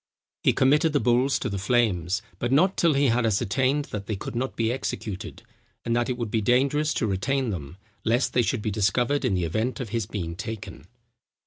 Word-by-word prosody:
He - - +4
committed 150 +4 +3
the 145 - +3
bulls 125 +3 +2
to - - -3
the 100 -4 -3
flames, 100 -5 +1 0.2
but 120 - -1
not 180 +8 +4
till 165 -4 +3
he 140 -1 +3
had 120 +1 +2
ascertained 130 +6 +1
that 105 -1 -5
they 110 - -1
could 95 - -7
not 130 +2 -2
be 115 0 0
executed, 110 -6 -5 0.4
and 115 - +1
that 120 +1 +1
it 125 - -1
would 115 -4 -4
be 110 - +1
dangerous 140 +7 +2
to - - 0
retain 120 +6 0
them, 80 -2 -6 0.3
lest 120 +4 +1
they 125 - +4
should 120 -1 -1
be 110 - -1
discovered 120 +7 +1
in 95 - +1
the 90 -2 0
event 110 - -2
of 125 -5 -4
his 115 -2 -2
being 85 -6 -4
taken. 95 -6 -7
120 Hz, 210 wpm, -25 LUFS, 100-130 Hz, 0.4 s, He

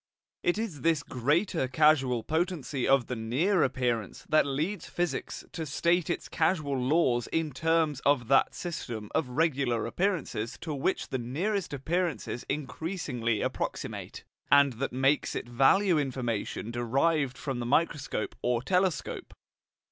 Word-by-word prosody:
It 175 - +1
is 205 - -4
this 160 0 +2
greater 145 - 0
causal 130 -4 +3
potency 160 - -1
of 135 -3 +4
the 125 - -4
near 140 - +1
appearance 125 -6 -1
that 155 -2 +4
leads 155 +7 -2
physics 175 0 -3
to 165 - -4
state 170 +4 +1
its 175 - -2
causal 155 -4 0
laws 130 -2 +2
in 160 -2 -1
terms 160 0 +1
of 140 -4 +2
that 135 0 +3
system 120 - -5
of 135 - 0
regular 135 -5 +1
appearances 150 - -2
to 160 - -4
which 145 +7 -1
the 130 - -2
nearest 175 - -2
appearances 155 -2 -2
increasingly 140 - -2
approximate, - - -4 0.3
and 140 -2 +6
that 135 - -1
makes 135 +3 +1
it - - -4
value 155 +9 +4
information 120 -5 -3
derived 135 +3 +1
from 130 -1 -4
the 120 - -3
microscope 140 -6 0
or 120 -1 0
telescope. 180 -2 -1
140 Hz, 135 wpm, -29 LUFS, 125-165 Hz, 0.3 s, and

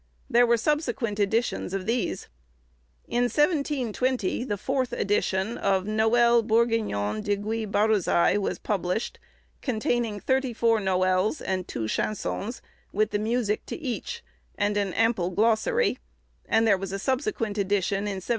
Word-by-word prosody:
There 240 +1 +5
were 235 0 +4
subsequent 240 -5 -1
editions 205 -2 0
of 190 -1 -3
these. 235 +2 -1 0.8
In 240 +1 +1
1720, 260 - 0
the 210 -5 -2
fourth 260 +2 -1
edition 200 +1 0
of 190 -1 +1
'Noël 230 +2 +4
Bourgignon 220 - +1
de 205 -1 0
Gui 215 +2 -3
Barôzai,' 205 -2 +2
was 200 - -2
published, 195 +1 -2 0.4
containing 230 -3 -1
thirty 260 +2 0
four 230 0 +2
noëls, 185 +4 +1
and 185 -1 -2
two 110 -2 -3
chansons, 215 - -3 0.3
with 215 +1 +1
the 205 - 0
music 215 -1 0
to - - -4
each, 325 - -5 0.3
and 205 0 +1
an 200 -2 0
ample 225 -5 +2
glossary; 230 - +2 0.5
and 225 0 +3
there 200 -4 +4
was 195 -1 -5
a 195 - -2
subsequent 230 - -1
edition 200 0 +1
in 195 -2 -3
1736. - - -14
220 Hz, 140 wpm, -26 LUFS, 200-240 Hz, 0.8 s, There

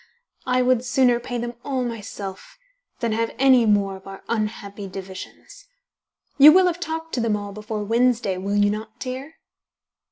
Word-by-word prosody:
I 250 0 +2
would 250 -1 +2
sooner 245 -1 +3
pay 245 0 -5
them 240 0 -4
all 265 -3 -1
myself 205 -4 -7 0.4
than 235 -2 0
have 225 +1 -1
any 260 -3 +5
more 200 -2 +2
of 190 - -16
our 195 0 -10
unhappy 210 -2 -3
divisions. 190 0 -10 0.7
You 295 +2 +11
will 370 +3 +6
have 345 -1 0
talked 325 -1 -5
to 245 - 0
them 225 -2 +1
all 205 -1 -5
before 215 +1 -5
Wednesday, 230 -3 +1
will 200 +2 -2
you 205 0 +3
not, 220 +2 -6
dear?" 265 +5 -6
230 Hz, 165 wpm, -23 LUFS, 205-255 Hz, 0.7 s, You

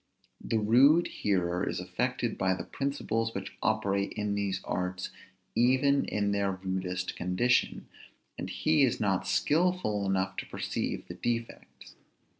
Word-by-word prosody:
The 115 - 0
rude 130 +10 +5
hearer 90 -3 0
is - - -3
affected - - -2
by 95 0 +1
the - - -5
principles 115 -5 -2
which 95 - -5
operate 100 -2 0
in 105 -1 -2
these 100 -2 -1
arts 90 0 -3 0.4
even 130 +3 +3
in 100 -1 0
their 100 -1 +1
rudest 95 -1 -3
condition; 90 +8 +1 0.5
and - - -5
he 155 -1 +2
is 130 -4 +3
not 95 -2 0
skilful 150 - +1
enough 95 0 0
to - - -4
perceive - - -3
the - - -6
defects. 115 -1 -5
100 Hz, 135 wpm, -30 LUFS, 95-120 Hz, 0.5 s, rude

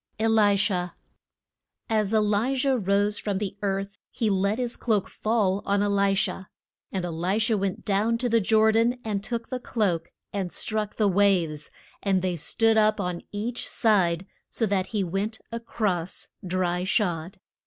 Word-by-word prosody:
ELISHA. 205 -5 +2 0.9
AS 215 -2 +1
E 220 - +3
li 215 +5 +2
jah 270 +1 +2
rose 205 -1 +1
from 205 -2 -2
the 195 -1 -3
earth 195 0 -2
he 220 -3 0
let 200 +2 +1
his 245 -2 -1
cloak 215 -5 0
fall 205 -3 0
on 200 0 +1
E - - +2
li 200 -1 +2
sha. 190 0 -1 0.5
And 185 -2 -2
E - - -3
li 175 +5 -1
sha 225 0 +2
went 195 -2 -2
down 215 +3 +1
to 245 +1 -1
the 230 -1 +3
Jor 220 +2 +4
dan, 230 +3 +2
and 205 -2 -2
took 235 -1 -4
the 255 - -3
cloak 185 -9 -1 0.2
and 190 -3 -2
struck 215 -1 -3
the 215 - +2
waves, 180 -6 +2 0.3
and 190 -2 +1
they 180 -1 0
stood 225 +7 +2
up 215 0 +3
on 180 -3 -2
each 225 +4 -4
side, 190 -6 +2 0.2
so 225 - -1
that 195 -2 0
he 210 -2 -1
went 195 +5 -2
a 230 - -3
cross 195 -7 -2 0.2
dry 180 0 0
shod. 185 -3 -1
205 Hz, 175 wpm, -26 LUFS, 190-220 Hz, 0.9 s, Jor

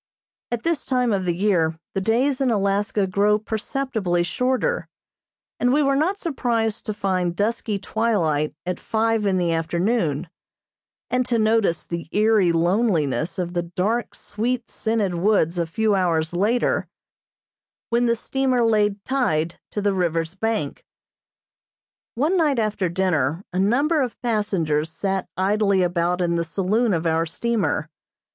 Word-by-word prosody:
At 240 -1 -2
this 335 -3 0
time 250 -3 +1
of 190 -2 -1
the 175 -1 0
year 170 -5 +1 0.2
the 195 - -1
days 255 +7 +1
in 265 - +2
Alaska 200 -1 +1
grow 200 +3 +2
perceptibly 220 -4 -2
shorter, 260 - 0 0.7
and 245 - +2
we 295 +3 +3
were 275 0 +2
not 340 +8 +1
surprised 235 - -1
to 215 - -1
find 185 -4 -1
dusky 210 +1 -1
twilight 170 -10 0
at 180 0 -3
five 225 -1 0
in 190 -1 +2
the 175 -2 +1
afternoon, 170 - 0 0.8
and 250 0 +2
to 235 - +1
notice 215 -6 +2
the 170 -1 -5
eerie 210 -4 +3
loneliness 170 - +1
of 175 -1 -3
the 175 - 0
dark, 195 +7 -2
sweet 240 +3 -3
scented 220 -4 -1
woods 175 -2 +1
a 170 - 0
few 215 +5 +1
hours 170 -4 +1
later, 215 +7 +1 1.0
when 240 +1 +2
the 235 - +3
steamer 255 +1 0
lay 210 -3 +3
tied 175 - 0
to 205 - -3
the 205 -1 +2
river's 165 -2 -1
bank. 210 -7 -2 1.3
One 300 +10 +1
night 300 -6 +2
after 210 -5 0
dinner 170 -3 0
a 180 - 0
number 280 - +2
of 250 -4 -3
passengers 180 -9 0
sat 190 +3 -2
idly 200 0 +2
about 175 0 0
in 170 -1 +1
the 170 - 0
saloon 205 +7 0
of 170 -2 -1
our 165 0 +1
steamer. 230 +5 -1
205 Hz, 145 wpm, -23 LUFS, 175-230 Hz, 1.3 s, we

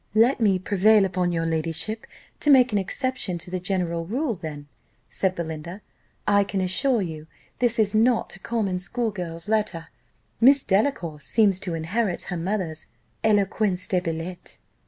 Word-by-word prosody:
"Let 235 +5 +4
me 205 -5 +3
prevail 205 +2 +4
upon 180 -1 0
your 165 -1 -1
ladyship 165 +7 -2 0.3
to 295 - 0
make 255 -3 +6
an 205 - +2
exception 215 -2 -2
to 175 +1 -9
the 185 - -2
general 175 -3 -2
rule 255 - -1
then," 150 -5 -7 0.4
said 190 -1 0
Belinda; 170 +3 -6 0.5
"I 200 -1 +5
can 195 0 -3
assure 205 +5 +1
you 160 -3 -7 0.3
this 240 -1 +1
is 215 -2 +2
not 225 0 +2
a - - -13
common 200 -5 -1
school 230 +5 -2
girl's 170 -3 -6
letter: 210 -7 -1 0.5
Miss 270 +3 +6
Delacour 190 - 0
seems 200 -2 +2
to 180 -4 -4
inherit 180 +4 -1
her - - -2
mother's 170 -3 -3 0.4
'eloquence 205 -3 +1
de 185 -1 +1
billet. 170 +1 -6
190 Hz, 155 wpm, -24 LUFS, 170-220 Hz, 0.5 s, make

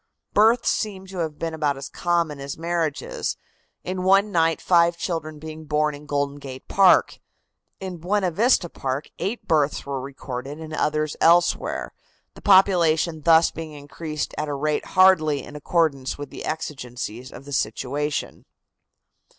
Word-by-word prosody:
Births 225 +3 +4
seem 195 -3 -2
to 190 -1 -8
have 160 -3 -3
been 165 -1 -3
about 150 -3 0
as 135 - -6
common 170 -4 -1
as 140 0 -6
marriages, 165 -2 -2 0.5
in 185 +1 -3
one 195 +3 +4
night 165 -2 +2
five 170 -1 +3
children 165 -3 -4
being 155 +1 -9
born 150 0 +1
in 145 +1 -11
Golden 145 -1 -1
Gate 130 -2 -9
Park. 190 -2 +4 0.6
In 185 -2 -6
Buena 185 +2 0
Vista 215 0 +3
Park 135 -2 -4
eight 200 +7 -3
births 150 -2 +1
were 140 -1 -3
recorded 135 +1 -7
and 160 -1 -8
others 155 0 0
elsewhere, 170 +1 +2 0.4
the - - -14
population 175 -5 +4
being 155 - -15
thus 165 0 +6
increased 155 0 -6
at 150 0 -2
a 145 - -2
rate 150 +2 -1
hardly 155 -7 +5
in 150 - -11
accordance 150 -3 0
with 145 -1 -8
the - - -7
exigencies 125 -5 -5
of 135 - -11
the 145 - -8
situation. 140 +5 -2
155 Hz, 150 wpm, -23 LUFS, 145-175 Hz, 0.6 s, thus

